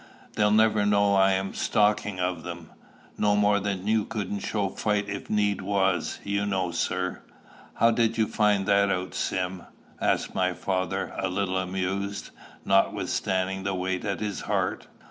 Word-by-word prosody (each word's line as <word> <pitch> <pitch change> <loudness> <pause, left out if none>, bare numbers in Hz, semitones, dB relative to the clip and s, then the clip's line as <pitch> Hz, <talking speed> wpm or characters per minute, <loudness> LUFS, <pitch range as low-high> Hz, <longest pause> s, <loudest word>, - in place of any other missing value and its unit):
They'll 105 0 +3
never 110 0 +4
know 100 -1 +3
I'm 95 0 +3
a - - -11
stalking 105 -2 +1
of 90 -2 -1
them. 85 0 -8 0.5
No 105 -1 +3
more 105 0 +3
you 100 +2 0
couldn't 105 -3 -4
show 100 0 -1
fight 105 0 -1
if 100 0 -6
need 105 -2 +1
was, 95 -2 0
you 100 0 -1
know, 95 -3 0
sir." 90 +2 -2 0.5
"How 115 - +4
did 115 0 +1
you 110 - +3
find 105 -2 +2
that 100 0 +3
out, 95 -1 -2
Sim?" 90 0 -2 0.4
asked - - 0
my 90 0 +1
father, 95 -1 -2
a - - 0
little 95 0 -1
amused, 95 +2 -3 0.3
notwithstanding 95 -1 +1
the 95 0 -2
weight 90 0 -2
at 100 -1 -2
his 105 -2 -3
heart. - - -1
100 Hz, 155 wpm, -26 LUFS, 95-105 Hz, 0.5 s, never